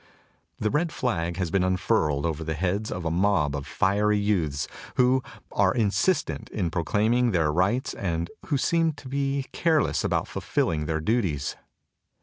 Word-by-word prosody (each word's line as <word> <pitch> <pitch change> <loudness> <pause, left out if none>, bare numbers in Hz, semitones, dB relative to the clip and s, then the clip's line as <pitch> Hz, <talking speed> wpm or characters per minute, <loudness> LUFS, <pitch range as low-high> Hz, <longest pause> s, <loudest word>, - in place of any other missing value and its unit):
The 110 - -1
red 160 +3 +1
flag 85 - -1
has 90 -4 -2
been 95 -2 +2
unfurled 85 -5 +1
over 80 -1 -2
the 80 0 -3
heads 95 +6 -1
of 90 -1 -4
a 80 - 0
mob 85 -5 +2
of 70 -2 -5
fiery 105 +2 +2
youths, 85 -9 0 0.3
who 125 +1 +4 0.3
are 95 -2 +2
insistent 105 - +1
in 85 - -2
proclaim 105 +7 +1
ing 125 0 +3
their 80 -4 +2
rights 95 +10 +1
and 85 -3 -2 0.2
who 145 - +1
seem 165 +3 +2
to 145 -2 -12
be 140 0 -1
careless 150 - +1
about - - 0
fulfilling 75 -2 -1
their 80 0 -1
duties. 85 - 0
95 Hz, 160 wpm, -26 LUFS, 80-120 Hz, 0.3 s, who